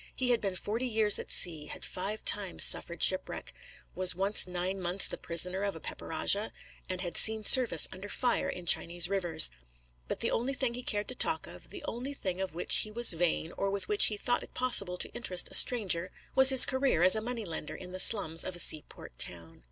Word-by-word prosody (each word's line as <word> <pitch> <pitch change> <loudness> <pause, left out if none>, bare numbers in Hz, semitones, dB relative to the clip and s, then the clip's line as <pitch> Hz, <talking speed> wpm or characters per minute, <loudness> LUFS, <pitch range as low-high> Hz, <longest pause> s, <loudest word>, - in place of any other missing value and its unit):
He 250 -1 -2
had 235 - -1
been 195 -2 -5
forty 225 +7 -5
years 215 -3 +2
at - - -10
sea, 155 -4 +2
had - - -9
five 200 +4 -7
times 200 -3 +2
suffered 170 - +2
shipwreck, 185 - 0 0.4
was 185 -1 0
once 195 +2 +2
nine 180 +2 -6
months 180 +2 +1
the - - -9
prisoner 180 +3 -5
of 200 -2 -5
a - - -11
pepper - - -11
rajah, 200 +6 -2 0.4
and 185 -1 -6
had 175 -2 -7
seen 220 0 +2
service 230 - +3
under 190 +2 -11
fire 245 +2 -3
in 180 - -9
Chinese 175 +1 +1
rivers; 175 - +2 0.6
but - - -6
the - - -2
only 260 +4 -4
thing 255 -2 -4
he 250 - -8
cared 210 -4 -5
to - - -6
talk - - -3
of, - - -14
the 385 -6 -12
only 270 +1 -8
thing 185 -6 -6
of 190 -4 -7
which 175 - +2
he 215 - -1
was 230 -1 +4
vain, 165 -1 -4
or 195 - -5
with 200 0 -6
which 415 0 +4
he 210 - -1
thought 245 +4 -3
it - - -16
possible 200 -8 -3
to - - -7
interest 185 -7 -1
a - - -11
stranger, 185 -7 +4 0.2
was 265 0 +7
his 265 -2 +11
career 260 - -2
as 185 +2 +7
a 220 - -4
money 235 -1 -5
lender 160 -3 -8
in 180 -1 -12
the 185 - -9
slums 185 -6 +3
of 185 - -8
a - - -9
seaport 155 -2 0
town. 85 -2 -6
195 Hz, 220 wpm, -27 LUFS, 175-230 Hz, 0.6 s, his